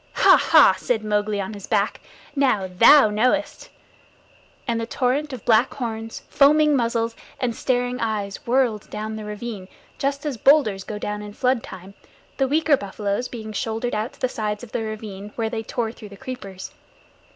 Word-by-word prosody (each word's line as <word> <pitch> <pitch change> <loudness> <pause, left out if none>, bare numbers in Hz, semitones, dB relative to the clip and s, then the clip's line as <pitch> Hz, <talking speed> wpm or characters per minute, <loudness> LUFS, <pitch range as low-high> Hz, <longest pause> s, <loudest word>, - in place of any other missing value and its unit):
"Ha! - - +6
Ha!" - - +6
said 225 -3 -1
Mowgli, 210 -1 0
on 195 +2 -4
his 200 -2 -9
back. 205 -1 0 0.3
"Now 255 -9 +2
thou 215 +6 +6
knowest!" 255 +8 0 1.0
and 230 -2 0
the 225 - -4
torrent 270 +5 0
of 255 -4 -8
black 230 +1 +3
horns, 225 -3 -5
foaming 300 +1 +4
muzzles, 230 -2 0 0.2
and 240 -3 -1
staring 245 0 -1
eyes 210 -3 -2
whirled 240 -4 +1
down 215 +1 -5
the 215 -1 -7
ravine 210 -2 -6 0.3
just 280 +2 -2
as 285 -5 -2
boulders 220 -8 +4
go 210 - -6
down 210 0 -4
in 210 0 -9
floodtime; 205 -7 -2 0.4
the 270 - +2
weaker 305 +1 +3
buffaloes 205 +1 -3
being 220 -3 -8
shouldered 225 +3 -2
out 215 +5 -2
to - - -21
the 255 - +1
sides 210 -2 -4
of 235 - -10
the - - -2
ravine 210 -2 -7
where 225 -1 -2
they 225 - -2
tore 225 0 -3
through 220 -2 -12
the 200 - -12
creepers. 195 -8 -8
225 Hz, 175 wpm, -23 LUFS, 210-255 Hz, 1.0 s, Ha